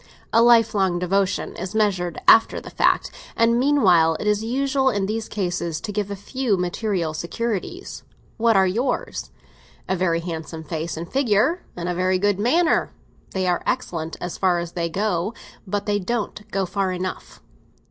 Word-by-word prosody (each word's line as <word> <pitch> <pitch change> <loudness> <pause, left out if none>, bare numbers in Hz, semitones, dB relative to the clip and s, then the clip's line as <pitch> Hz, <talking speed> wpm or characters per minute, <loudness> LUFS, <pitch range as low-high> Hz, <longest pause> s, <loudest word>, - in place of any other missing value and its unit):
A 230 - +6
lifelong 220 -6 +4
devotion 185 +2 0
is 185 +4 -5
measured 190 -6 0
after 225 - +6
the - - -11
fact; - - +2 0.2
and 230 +1 +3
meanwhile 185 - +4
it - - -4
is 210 -1 +2
customary 265 0 +1
in 195 - 0
these 220 +2 -3
cases 175 -5 -2
to 210 - -5
give 205 -1 -2
a 200 - -3
few 220 +2 -1
material 180 -2 -1
securities. 230 - -4 0.4
What 230 -1 +3
are 190 -1 +5
yours? 240 +7 -2 0.6
A 190 - +1
very 170 -2 +1
handsome 160 -1 -6
face 160 +1 -4
and 170 +1 -5
figure, 265 - +2 0.2
and 175 0 -3
a 180 - 0
very 185 +1 +1
good 200 +1 +1
manner. 315 +10 +2 0.4
They 190 -1 0
are 180 -1 +1
excellent 165 -10 -2
as 175 - -5
far 185 -2 +3
as 170 -1 -4
they 170 -1 -2
go, 195 +2 -1 0.3
but 205 +1 -2
they 205 -1 +1
don't 210 +1 -3
go 195 -1 -1
far 190 +1 -1
enough." 185 0 -5
195 Hz, 170 wpm, -23 LUFS, 175-225 Hz, 0.6 s, A